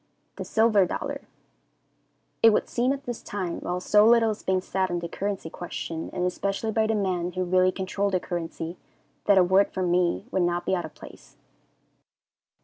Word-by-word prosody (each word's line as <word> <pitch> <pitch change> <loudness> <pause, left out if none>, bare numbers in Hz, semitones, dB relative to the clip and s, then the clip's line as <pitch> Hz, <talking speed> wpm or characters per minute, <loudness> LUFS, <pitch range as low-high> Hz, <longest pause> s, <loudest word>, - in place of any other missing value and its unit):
The - - -5
Silver 220 -4 +3
Dollar. 280 +7 -4 1.2
It 225 - +8
would - - +1
seem 250 +2 +1
at 275 0 -3
this 240 -3 -5
time, 185 -4 -4
while 180 +1 -3
so 210 +3 +4
little 225 0 +5
is 210 - -6
being 190 0 +1
said 190 0 -1
on 175 - -1
the 170 0 -4
currency 195 0 -4
question, 165 -2 -5
and 180 - -2
especially 195 +4 -2
by 220 0 +1
the 220 - +1
men 180 -3 -1
who 185 - -1
really 185 +1 +3
control 195 +2 -2
the 185 -2 +1
currency, 170 -1 -5 0.5
that 200 -1 +5
a 185 - +7
word 190 +3 +3
from 185 -2 -1
me 180 +2 +1
would 190 - +1
not 175 0 0
be - - 0
out 175 -3 0
of 160 - -11
place. - - -14
190 Hz, 190 wpm, -26 LUFS, 175-210 Hz, 1.2 s, It